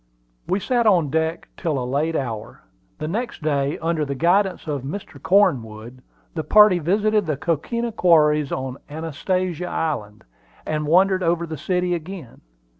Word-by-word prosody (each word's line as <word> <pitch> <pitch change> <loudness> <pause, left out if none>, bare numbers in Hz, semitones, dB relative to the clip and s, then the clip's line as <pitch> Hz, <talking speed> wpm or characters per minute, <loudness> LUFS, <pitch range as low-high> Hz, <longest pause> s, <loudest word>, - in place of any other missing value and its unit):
We 190 - +1
sat 240 +1 +1
on 170 -9 +3
deck 160 +1 -1
till 160 -5 -2
a 125 - -2
late 145 +6 -1
hour. 115 -7 -5 0.3
The 155 - -4
next 220 0 -4
day, 145 -1 0
under 165 -1 -1
the 140 -1 -3
guidance 185 +6 +2
of 145 -4 -3
Mr. 150 +10 -7
Cornwood, 125 - +1 0.3
the 160 - -3
party 210 -2 +6
visited 205 +4 +1
the 155 -3 -1
coquina 230 - -2
quarries 150 -7 +3
on 130 0 -4
Anastasia 170 +3 -2
Island, 110 -10 -3 0.4
and 150 -1 -2
wandered 185 +3 +4
over 170 -1 +1
the 160 -1 -6
city 180 +2 -1
again. 170 -5 -7
160 Hz, 150 wpm, -22 LUFS, 145-185 Hz, 0.4 s, party